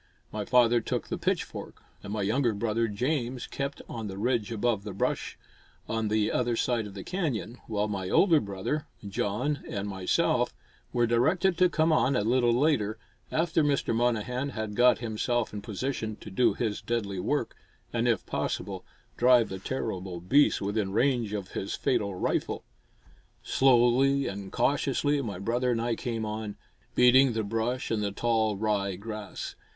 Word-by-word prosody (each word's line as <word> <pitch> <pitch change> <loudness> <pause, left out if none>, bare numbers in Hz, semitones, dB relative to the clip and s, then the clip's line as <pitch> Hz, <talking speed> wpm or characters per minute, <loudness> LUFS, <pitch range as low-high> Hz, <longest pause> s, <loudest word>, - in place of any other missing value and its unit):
My 105 -1 -3
father 120 -1 +4
took - - -3
the - - -2
pitchfork - - -3 0.2
and 100 - -8
my 105 -1 -1
younger 115 +2 +1
brother 115 +2 0
James 125 +3 -2
kept 140 0 -4
on 115 -2 -5
the 95 -1 -6
ridge 115 0 0
above 115 -2 0
the 105 -2 -6
brush - - -1 0.5
on 110 -1 -1
the 105 0 +1
other 120 -1 +1
side 115 -2 0
of 100 - -11
the 95 - -6
canyon, 135 - -3
while 105 -1 0
my 95 -3 -3
older 170 - +5
brother 100 +9 -3 0.2
John 115 +9 -1
and 100 0 -3
myself 95 -2 +1 0.4
were 120 -1 +2
directed 160 +11 +2
to 180 -1 +5
come 160 -1 +2
on 135 -3 +3
a 105 - +2
little 120 +2 +3
later, 120 -8 +2 0.3
after 165 0 +2
Mr. 145 -5 +1
Monnehan 125 +3 0
had 110 -2 -4
got 125 +1 +5
himself 120 0 -1
in 105 - -5
position 110 +1 -3
to - - -11
do 120 +6 +3
his 110 -3 -2
deadly 105 -4 -2
work, - - -1 0.4
and, - - +1
if - - +1
possible, 95 0 -3 0.3
drive 125 -2 +5
the 95 - -5
terrible 95 -6 -4
beast 135 +12 +3
within 100 0 -1
range 120 -1 +1
of 100 -3 -4
his 95 - -3
fatal 110 -8 0
rifle. - - -1 0.8
Slowly 135 +2 +4
and 100 -1 -5
cautiously 145 +1 +1
my 105 -8 -4
brother 120 +6 0
and 120 -2 +1
I 120 +1 0
came 115 -3 -3
on, 105 -1 -4 0.4
beating 125 +1 +6
the 110 -1 -1
brush 115 +4 -2
and 110 -2 +1
the 100 -1 -1
tall 110 -1 +1
rye 100 -2 0
grass. 105 +1 -6
115 Hz, 165 wpm, -28 LUFS, 105-125 Hz, 0.8 s, beating